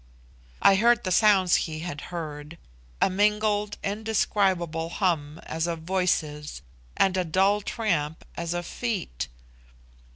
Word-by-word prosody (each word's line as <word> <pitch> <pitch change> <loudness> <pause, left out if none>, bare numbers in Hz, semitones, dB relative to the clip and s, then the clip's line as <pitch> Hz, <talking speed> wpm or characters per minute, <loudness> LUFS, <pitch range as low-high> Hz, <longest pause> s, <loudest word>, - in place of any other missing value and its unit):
I 195 - +7
heard 235 +2 +4
the 185 - -2
sounds 190 -2 +5
he 155 0 -5
had 160 -4 -5
heard 155 -2 -6 0.4
a - - +4
mingled 210 +1 +1
indescribable 195 -6 0
hum 165 -5 -1
as 160 +1 -2
of 165 -1 -3
voices 155 - -1 0.3
and 190 -1 +3
a 185 - +2
dull 190 +5 +2
tramp 170 -9 -2
as 170 0 -3
of 175 0 -3
feet. 180 - -3
180 Hz, 125 wpm, -26 LUFS, 160-205 Hz, 0.4 s, I